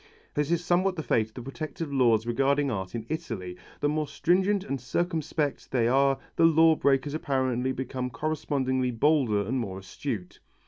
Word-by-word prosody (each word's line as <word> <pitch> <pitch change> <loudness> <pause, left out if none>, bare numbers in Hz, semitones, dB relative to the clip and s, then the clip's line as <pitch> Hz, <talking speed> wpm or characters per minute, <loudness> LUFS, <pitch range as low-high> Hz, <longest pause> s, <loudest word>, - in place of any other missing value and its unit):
This 150 0 0
is 170 0 0
somewhat 185 +2 +2
the 160 - -4
fate 110 -6 +1
of 110 - -25
the 125 - -7
protective 155 +2 -5
laws 115 -5 +3
regarding 140 +3 +1
art 95 -1 -4
in 115 -2 -4
Italy, 115 - -4 0.3
the 145 - +2
more 150 0 0
stringent 190 +5 +1
and 135 -9 -4
circumspect 155 0 -2
they 120 -3 +2
are 135 +2 +3 0.2
the 165 - +5
law 160 0 +6
breaker 140 0 +1
apparently 130 -4 0
becomes 130 -1 -3
correspondingly 130 -4 -1
bolder 125 -4 +2
and 130 +5 -1
more 100 -5 -4
astute. 95 0 -6
135 Hz, 170 wpm, -27 LUFS, 120-155 Hz, 0.3 s, law